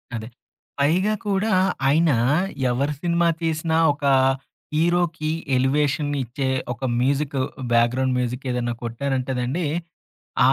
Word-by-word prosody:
అదే 110 -1 -5 0.5
పైగా 180 +9 +2
కూడా 200 +2 +1 0.4
ఆయన 160 +2 +4 0.6
ఎవరు 140 +4 0
సినిమా 170 -1 +2
తీసినా 160 0 0 0.2
ఒక 145 0 -6 0.7
హీరోకి 170 -1 +1 0.3
ఎలివేషన్ 145 +3 +1
ఇచ్చే 130 +3 -3 0.2
ఒక 120 +3 -12 0.2
మ్యూజిక్ 140 +2 0 0.4
బ్యాక్‌గ్రౌండ్ 125 +2 +2
మ్యూజిక్ 125 +2 -3
ఏదైనా 120 -1 -1
కొట్టారంటేనండి 130 +4 -2 0.9
ఆ - - +5
140 Hz, 105 wpm, -23 LUFS, 125-160 Hz, 0.9 s, ఆ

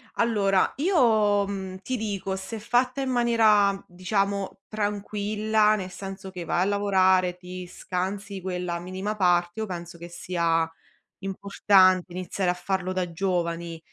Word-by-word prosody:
allora, 200 -5 +2
io, 220 - +3
mhmm, 190 -2 -5
ti 255 +5 -3
dico, 200 -3 -3
se 195 +3 -6
fatta 250 +4 +1
in 265 - -1
maniera 220 -5 +3
diciamo 195 +2 -2
tranquilla, 210 +1 +1
nel 185 -3 -4
senso 195 +1 -8
che 180 -2 -7
vai 175 - 0
a - - +3
lavorare, 190 -3 +2
ti 180 0 -8
scansi 190 +2 -4
quella 180 -2 -3
minima 190 +4 -4
parte, 175 +1 +2
io - - -1
penso 170 -3 -7
che 170 +1 -9
sia 170 -2 0 0.5
importante 190 -1 +3
iniziare 185 0 -2
a - - +3
farlo 185 0 -2
da 180 -2 -2
giovani. 170 -2 -2
195 Hz, 140 wpm, -26 LUFS, 180-210 Hz, 0.5 s, io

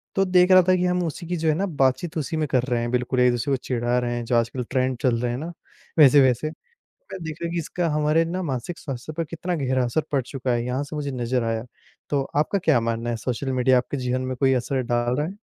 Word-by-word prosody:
तो 195 - +3
देख 180 0 +4
रहा 185 0 +9
था 185 - +5
कि 180 0 0
हम 180 0 +1
उसी 165 +2 -6
की 175 +1 -2
जो 160 0 -1
है - - +4
ना 190 +5 0
बातचीत 155 0 0
उसी 155 +1 -2
में 155 -1 0
कर 130 -2 +1
रहे 125 -2 0
हैं, 120 0 -2
बिल्कुल 125 +1 0
एक 125 0 +5
दूसरे 120 +3 -2
को - - +2
चिढ़ा 120 -1 0
रहे 120 -1 -2
हैं, 120 - -3
जो 120 - 0
आजकल 120 +2 0
ट्रेंड 130 -1 0
चल 125 -3 +2
रहे 120 - 0
हैं 120 - -3
ना, 160 +5 -5 0.5
वैसे-वैसे। 140 -1 +5 0.4
मैंने - - -12
देखा 160 +2 -4
कि 170 - -2
इसका 170 +1 -2
हमारे 150 +1 +2
ना 180 +3 -3
मानसिक 145 +3 -4
स्वास्थ्य 135 +1 -6
पर 165 - -1
कितना 165 +3 -4
गहरा 130 -3 0
असर 120 +6 0
पड़ 140 -2 +2
चुका 130 0 -4
है, 120 -1 0
यहाँ 125 +3 -1
से 150 +2 -8
मुझे 145 -2 -3
नज़र 125 -1 -1
आया। 115 0 -2 0.5
तो 140 -2 +1
आपका 155 +7 +2
क्या 155 -9 +3
मानना 115 +1 -2
है 115 - -1
सोशल 130 +3 -3
मीडिया 130 0 +3
आपके 125 +3 -3
जीवन 125 -1 -1
में 130 0 -3
कोई 135 0 +3
असर 130 +1 -1
डाल 120 0 0
रहा 150 - 0
है? 190 +4 -7
135 Hz, 260 wpm, -24 LUFS, 125-160 Hz, 0.5 s, रहा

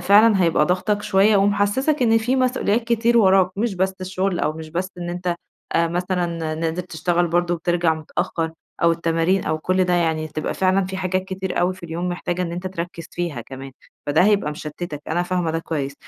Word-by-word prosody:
فعلًا 205 -1 +5
هيبقى 160 -3 +3
ضاغطَك 205 +3 0
شوية 205 +1 +4
ومحسسَك 205 +9 +2
إن 225 -1 +4
في 245 +4 0
مسؤوليات 245 -3 +1
كتير 235 0 +2
وراك، 190 -3 +5
مش 220 -1 0
بس 190 +1 0
الشغل 185 0 -1
أو 150 - +1
مش 160 0 -8
بس 185 +4 -2
إن 175 0 -4
أنتَ، 175 0 -2 0.4
آآ 165 0 +2
مثلًا 175 -2 -2
نازل 165 +2 -2
تشتغل 175 0 0
برضه 175 +1 +1
وبترجع 170 -1 +1
متأخر 160 +1 -3 0.3
أو 170 0 +5
التمارين 165 +3 +1
أو 155 0 -1
كل 185 +3 +1
ده، 180 - +1
يعني 160 -2 +1
هتبقى 155 0 -4
فعلًا 190 0 +2
في 190 +1 -5
حاجات 185 0 -1
كتير 190 -1 -3
أوي 180 +1 +1
في 185 - -17
اليوم 170 +2 -3
محتاجة 175 0 -2
إن 170 -1 -3
أنتَ 180 +2 -5
تركز 170 -2 -5
فيها 170 -8 -3
كمان، 135 +3 -9 0.3
فده 145 +4 +3
هيبقى 205 -7 +2
مشتتك. 150 0 -6
أنا 175 +3 +1
فاهمة 180 -2 -1
ده 165 - -1
كويس. 145 -4 -3
175 Hz, 195 wpm, -22 LUFS, 165-190 Hz, 0.4 s, فعلًا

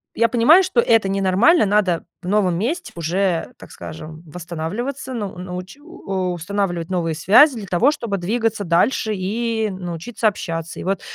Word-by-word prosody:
я 230 +1 +3
понимаю, 255 +11 +5
что 265 -10 +2
это 225 -4 +3
ненормально, 195 - +3
надо 195 -4 +1 0.2
в - - -7
новом 190 -4 +2
месте 260 - -3
уже, 170 +1 -1
так - - -14
скажем, 155 - -9
восстанавливаться, 180 - -5
ну 205 -6 -5
ну 180 0 -6
уч 185 +9 -9
у 190 -10 -4
устанавливать 175 -1 -3
новые 165 -3 -1
связи 245 - +5
для 205 -4 -7
того, 210 +12 +3
чтобы 235 -9 -3
двигаться 220 +3 -1
дальше 210 +6 +1
и 220 +3 -1
научиться 185 +5 -3
общаться. 165 -5 -4
И - - -6
вот 195 -1 -1
195 Hz, 160 wpm, -20 LUFS, 175-230 Hz, 0.2 s, понимаю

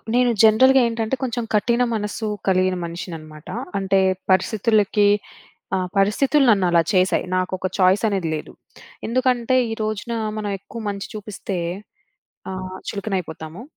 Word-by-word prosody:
నేను 245 0 +4
జనరల్‌గా 260 +5 +6
ఏంటంటే, 230 +1 -1
కొంచెం 240 -1 -2
కఠిన 235 +4 +2
మనస్సు 210 +1 -3 0.2
కలిగిన 185 0 +2
మనిషినన్నమాట. 160 -3 -8 0.3
అంటే 195 0 +2 0.3
పరిస్థితులకి 210 +1 +3 0.7
ఆహ్, 185 -1 -1
పరిస్థితులు 265 +8 +3
నన్ను 195 -3 +3
అలా 170 -1 +5
చేసాయి. 185 0 +2
నాకొక 185 0 -1
చాయిస్ 190 +3 +4
అనేది 190 -5 -1
లేదు. 150 - -7 0.5
ఎందుకంటే, 255 +1 +1 0.2
ఈరోజున 215 +1 -3 0.2
మనం 210 -1 -3
ఎక్కువ 220 +4 -9
మంచి 200 -1 -5
చూపిస్తే 205 -2 -5 0.9
ఆహ్, 185 0 -6
చులకనయిపోతాము. 185 -4 -5
205 Hz, 120 wpm, -22 LUFS, 185-230 Hz, 0.9 s, జనరల్‌గా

